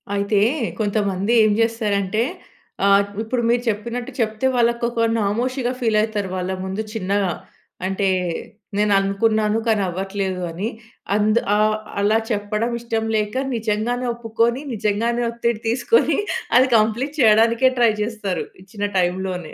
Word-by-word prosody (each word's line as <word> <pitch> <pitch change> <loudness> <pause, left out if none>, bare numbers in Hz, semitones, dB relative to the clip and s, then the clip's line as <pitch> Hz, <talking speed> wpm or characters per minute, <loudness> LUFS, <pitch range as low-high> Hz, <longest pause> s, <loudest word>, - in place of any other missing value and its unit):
అయితే 200 0 +1 0.4
కొంతమంది 205 -1 0
ఏం 215 - +4
చేస్తారంటే 215 -2 0 0.6
ఆహ్, 200 0 +5 0.2
ఇప్పుడు 235 +2 -1
మీరు 240 0 +2
చెప్పినట్టు 235 +3 -3
చెప్తే 220 +4 0
వాళ్ళకి 235 0 +1
ఒక 230 -1 0
నామోషీగా 245 +5 -1
ఫీల్ 225 -3 +1
అయితారు 210 -3 -2
వాళ్ళ 185 +1 -2
ముందు 190 +3 -3
చిన్నగా. 200 -2 0 0.5
అంటే 195 0 0 0.7
"నేను 210 -1 +3
అనుకున్నాను 210 +2 +1
కానీ 215 -2 +2
అవ్వట్లేదు", 190 0 -3
అని 195 +7 -3 0.5
అంద్ 215 +2 +3 0.2
ఆహ్, 215 0 +3 0.3
అలా 215 +2 +3
చెప్పడం 210 +3 -1
ఇష్టం 225 -1 -2
లేక 210 +2 -1 0.2
నిజంగానే 230 +3 -1
ఒప్పుకొని, 235 +3 0
నిజంగానే 225 +3 0
ఒత్తిడి 235 -1 -1
తీసుకొని 265 - +2 0.4
అది 260 +1 +5
కంప్లీట్ 240 +8 0
చేయడానికే 230 +2 +5
ట్రై 235 -2 +5
చేస్తారు 210 -4 -3 0.2
ఇచ్చిన 205 +1 -5
టైమ్‌లోనే. 180 -1 -1
215 Hz, 125 wpm, -21 LUFS, 200-235 Hz, 0.7 s, ఆహ్